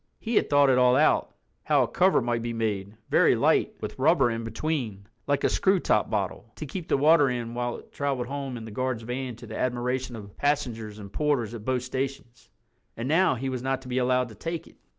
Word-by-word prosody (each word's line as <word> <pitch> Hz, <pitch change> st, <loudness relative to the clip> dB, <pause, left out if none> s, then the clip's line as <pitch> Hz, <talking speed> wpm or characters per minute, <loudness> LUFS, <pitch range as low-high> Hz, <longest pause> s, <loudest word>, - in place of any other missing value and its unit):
He 230 Hz, -, -4 dB
had -, -, +3 dB
thought 145 Hz, -1 st, +5 dB
it 125 Hz, -, +4 dB
all 125 Hz, 0 st, +5 dB
out—how 155 Hz, +3 st, +1 dB
a -, -, -1 dB
cover 185 Hz, -3 st, +3 dB
might 120 Hz, -1 st, -1 dB
be 120 Hz, 0 st, -3 dB
made, 105 Hz, -2 st, -2 dB
very -, -, +5 dB
light, -, -, +2 dB
with -, -, -6 dB
rubber 135 Hz, -3 st, +4 dB
in 115 Hz, 0 st, -3 dB
between, 115 Hz, -4 st, -3 dB, 0.2 s
like 145 Hz, -1 st, +1 dB
a -, -, +5 dB
screw 190 Hz, 0 st, +2 dB
top 105 Hz, -10 st, +1 dB
bottle, 105 Hz, +2 st, -3 dB
to 155 Hz, -, -6 dB
keep 165 Hz, +4 st, -6 dB
the -, -, +2 dB
water 145 Hz, 0 st, +5 dB
in 120 Hz, -2 st, -3 dB
while 120 Hz, 0 st, -2 dB
it -, -, -15 dB
traveled 140 Hz, -3 st, -2 dB
home 135 Hz, -1 st, -5 dB
in 115 Hz, -, -8 dB
the 110 Hz, -, -8 dB
guard's 130 Hz, 0 st, -2 dB
van 125 Hz, +1 st, -4 dB
to 120 Hz, -, -12 dB
the 110 Hz, 0 st, -7 dB
admiration 125 Hz, 0 st, -1 dB
of 100 Hz, -2 st, -10 dB
passengers 115 Hz, -7 st, -1 dB
and 100 Hz, -2 st, -10 dB
porters 140 Hz, -7 st, 0 dB
at 110 Hz, -2 st, -8 dB
both 130 Hz, -1 st, 0 dB
stations. 130 Hz, -2 st, -5 dB, 0.5 s
And 115 Hz, +2 st, -3 dB
now—he 145 Hz, -5 st, +2 dB
was 130 Hz, -2 st, -3 dB
not 135 Hz, 0 st, -2 dB
to -, -, -11 dB
be 125 Hz, +1 st, 0 dB
allowed 125 Hz, 0 st, +1 dB
to 110 Hz, -, -12 dB
take 165 Hz, +8 st, -4 dB
it. -, -, -19 dB
125 Hz, 220 wpm, -26 LUFS, 115-140 Hz, 0.5 s, thought